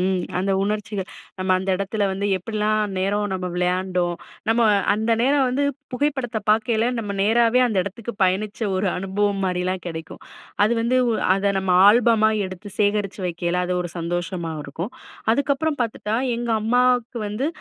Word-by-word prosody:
ம் 185 0 +1 0.2
அந்த 190 +2 0
உணர்ச்சிகள். 210 -1 -3 0.3
நம்ம 185 0 -2
அந்த 190 +1 -2
இடத்தில 200 +2 -1
வந்து 195 +1 -2
எப்படிலாம் 215 +1 -1
நேரம் 205 +2 0
நம்ம 185 -1 -3
விளையாண்டோம். 180 0 0 0.3
நம்ம 225 +1 +3 0.3
அந்த 220 +2 -1
நேரம் 275 +1 +3
வந்து 265 +3 0 0.3
புகைப்படத்த 255 -3 -1
பார்க்கையில 220 +1 +2
நம்ம 205 -3 -3
நேராவே 230 +3 +4
அந்த 220 -4 -2
இடத்துக்கு 210 +5 -6
பயணிச்ச 200 +4 -1 0.2
ஒரு 190 +2 0
அனுபவம் 195 +1 -1
மாரிலாம் 185 0 -1
கிடைக்கும். 160 -1 -7 0.4
அது 215 - +2
வந்து 240 +3 +2 0.4
அதை 200 +1 +1
நம்ம 190 -1 -1 0.2
ஆல்பமா 220 -1 +4 0.2
எடுத்து 185 +2 -9
சேகரித்து 205 -1 0
வக்கயில, 175 +1 -1
அது 180 0 -1
ஒரு 175 - -6
சந்தோஷமா 170 0 -3
இருக்கும். 170 - -6 0.4
அதுக்கப்புறம் 285 +4 0
பார்த்துட்டா 220 -1 -2 0.2
எங்க 240 0 -3
அம்மாவுக்கு 245 +1 +2
வந்து 215 +7 -2
205 Hz, 145 wpm, -22 LUFS, 185-230 Hz, 0.4 s, நேராவே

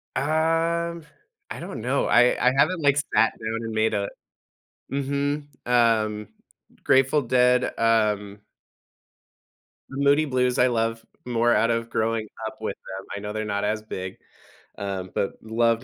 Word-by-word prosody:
Um, 165 +3 0 0.5
I - - -5
don't - - -6
know. - - 0
I 120 +1 +5
I - - +1
haven't, 180 +4 +3
like, 140 -1 +3
sat 135 -5 +2
down 115 +1 -3
and 115 - -4
made 110 0 +1
a 100 -1 -1 0.8
Mhm, 140 +1 -1 0.2
um, 110 -3 +2 0.6
Grateful 135 +3 +4
Dead, 125 0 +3
um 105 -3 +1 1.5
Moody 140 +3 +3
Blues, 125 -3 0
I 125 - +5
love, 115 -1 -1 0.2
more 120 -1 +2
out 115 +1 +3
of 115 0 -2
growing 115 -1 -1 0.2
up - - -9
with - - -3
them. 95 0 -9
I - - -4
know 105 +1 -5
they're 110 0 -2
not 100 -1 -2
as 110 +1 -1
big, 95 -3 -6 0.6
um, 95 -2 -4
but 100 - -1
love 115 +1 +1
115 Hz, 145 wpm, -24 LUFS, 110-135 Hz, 1.5 s, I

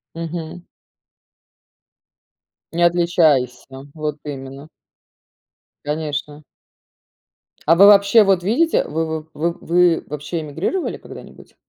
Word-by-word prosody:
Мгм. 165 +1 -6 2.1
Не 170 +1 0
отличайся, 170 -7 +2 0.3
вот 150 -1 -4
именно. 135 0 -8 1.2
Конечно. 150 0 -4 1.2
А 165 - +6
вы 195 +4 +7
вообще 205 +2 +6
вот 195 -3 +2
видите, 265 - +2
вы 160 0 -3
в 155 - -25
в 170 +3 -2
вы, 175 -1 +2
вообще, 150 +3 -5
эмигрировали 160 - -3
когда-нибудь? - - -14
165 Hz, 90 wpm, -19 LUFS, 150-175 Hz, 2.1 s, вы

